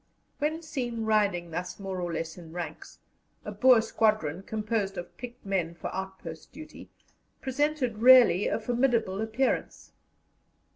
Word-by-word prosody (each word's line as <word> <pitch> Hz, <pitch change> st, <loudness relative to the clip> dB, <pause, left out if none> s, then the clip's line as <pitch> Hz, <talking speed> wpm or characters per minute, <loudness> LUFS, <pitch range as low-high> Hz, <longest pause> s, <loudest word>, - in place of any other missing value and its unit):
When 315 Hz, +3 st, -1 dB
seen 245 Hz, -7 st, -3 dB
riding 200 Hz, -6 st, +1 dB
thus 180 Hz, +5 st, -5 dB
more 190 Hz, -2 st, -4 dB
or 175 Hz, -1 st, -3 dB
less 165 Hz, 0 st, -4 dB
in 170 Hz, -3 st, -12 dB
ranks, 175 Hz, -1 st, -7 dB, 0.5 s
a -, -, -4 dB
Boer 255 Hz, -3 st, +5 dB
squadron, 215 Hz, -7 st, +1 dB
composed 210 Hz, -1 st, -2 dB
of 175 Hz, 0 st, -7 dB
picked 245 Hz, -1 st, -10 dB
men 180 Hz, -4 st, -1 dB
for -, -, -6 dB
outpost 190 Hz, -4 st, -7 dB
duty, 310 Hz, 0 st, -11 dB, 0.5 s
presented 265 Hz, -4 st, -1 dB
really 240 Hz, -6 st, +7 dB
a -, -, 0 dB
formidable 235 Hz, -4 st, 0 dB
appearance. 225 Hz, +4 st, -1 dB
215 Hz, 135 wpm, -28 LUFS, 180-245 Hz, 0.5 s, really